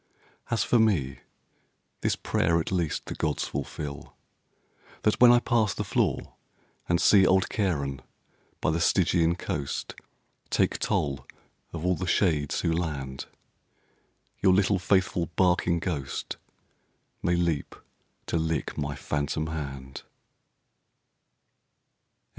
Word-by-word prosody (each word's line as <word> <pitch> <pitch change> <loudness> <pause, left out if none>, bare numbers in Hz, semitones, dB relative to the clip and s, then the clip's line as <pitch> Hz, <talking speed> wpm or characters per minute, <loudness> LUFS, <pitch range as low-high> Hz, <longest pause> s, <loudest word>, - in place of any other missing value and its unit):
As 115 - +1
for 120 - +3
me, 85 -12 +1 0.8
This - - 0
prayer 85 +1 +1
at 80 - -3
least 85 -5 -1
the - - -5
gods - - -1
fulfill 70 -2 -6 0.9
That 105 - +1
when 120 -1 +9
I 120 - +7
pass 120 -4 +1
the - - -2
floor, - - -1 0.6
and 85 -1 +3
see 100 0 +6
Old 95 0 +4
Charon 70 -10 -1 0.6
by - - +2
the 80 - 0
Stygian 85 -1 +3
coast 75 -4 -4 0.6
Take - - +1
toll 70 -3 -1 0.4
of 85 0 -5
all 90 - +3
the 90 +1 -3
shades 80 -7 +1
who 85 - +1
land, 70 -6 -3 1.1
Your 95 - +4
little, 100 0 +3
faithful, 95 -2 +1
barking 90 -2 +3
ghost 75 -6 -4 0.8
May 85 - +1
leap 85 -4 -1 0.5
to - - -1
lick 80 -1 -2
my 70 -1 -2
phantom 75 +2 -2
hand. 70 -4 -6
85 Hz, 120 wpm, -27 LUFS, 75-95 Hz, 1.1 s, when